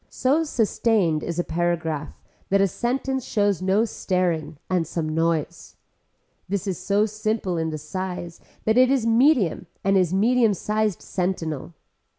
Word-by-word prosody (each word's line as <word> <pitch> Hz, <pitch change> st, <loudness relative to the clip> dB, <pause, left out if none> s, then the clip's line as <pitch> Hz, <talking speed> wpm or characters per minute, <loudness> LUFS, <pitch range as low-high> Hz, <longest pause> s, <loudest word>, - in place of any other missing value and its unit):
So 285 Hz, +5 st, +1 dB
sustained 220 Hz, -, +1 dB
is 170 Hz, +1 st, -4 dB
a 175 Hz, -, +1 dB
paragraph 165 Hz, -3 st, -2 dB, 0.3 s
that 195 Hz, -, +3 dB
a 195 Hz, -, +4 dB
sentence 260 Hz, +5 st, -2 dB
shows 205 Hz, -5 st, 0 dB
no 195 Hz, +4 st, +2 dB
staring 180 Hz, -7 st, -1 dB
and 180 Hz, -4 st, 0 dB
some 165 Hz, -1 st, -3 dB
noise. 165 Hz, -1 st, -1 dB, 0.7 s
This 200 Hz, -2 st, -2 dB
is 190 Hz, -4 st, -3 dB
so 205 Hz, +1 st, +2 dB
simple 215 Hz, -3 st, -2 dB
in 160 Hz, -1 st, -1 dB
the 155 Hz, -, -4 dB
size 175 Hz, +2 st, -5 dB, 0.2 s
that 220 Hz, +3 st, +4 dB
is 255 Hz, -2 st, +4 dB
medium 230 Hz, -, +3 dB, 0.2 s
and 195 Hz, +1 st, +2 dB
is 180 Hz, -3 st, +1 dB
medium 225 Hz, +2 st, +3 dB
sized 210 Hz, 0 st, -1 dB
sentinel. 175 Hz, -4 st, -3 dB
190 Hz, 145 wpm, -24 LUFS, 170-220 Hz, 0.7 s, a